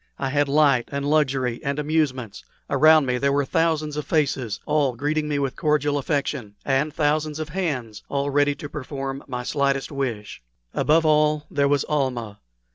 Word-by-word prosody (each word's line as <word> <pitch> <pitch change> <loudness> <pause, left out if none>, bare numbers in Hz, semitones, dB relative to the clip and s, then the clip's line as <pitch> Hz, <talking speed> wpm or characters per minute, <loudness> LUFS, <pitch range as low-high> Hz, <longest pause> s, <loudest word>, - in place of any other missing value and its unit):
I 135 - -2
had 145 +1 +1
light 140 -4 +3
and 140 0 -2
luxury 135 -5 +1
and 140 +1 -2
amusements. 145 -7 -1 0.3
Around 155 -1 +6
me 125 -1 0
there 140 +1 +2
were 140 0 +1
thousands 155 0 0
of 150 - -2
faces, 140 -8 0
all 145 -4 +1
greeting 150 +4 -1
me 150 -1 -1
with 135 -2 -1
cordial 150 -3 +1
affection, 140 -7 -2
and 140 +3 +1
thousands 155 0 0
of 155 0 -5
hands 135 - -3
all 140 0 -1
ready 145 0 +2
to 145 - -7
perform 135 -1 -5
my 125 -2 -4
slightest 140 +1 0
wish. 120 - -4 0.3
Above 160 +2 +3
all, 150 -1 +3
there 140 -1 +2
was 140 -1 +2
Almah. 125 -8 -2
145 Hz, 170 wpm, -23 LUFS, 135-150 Hz, 0.3 s, Around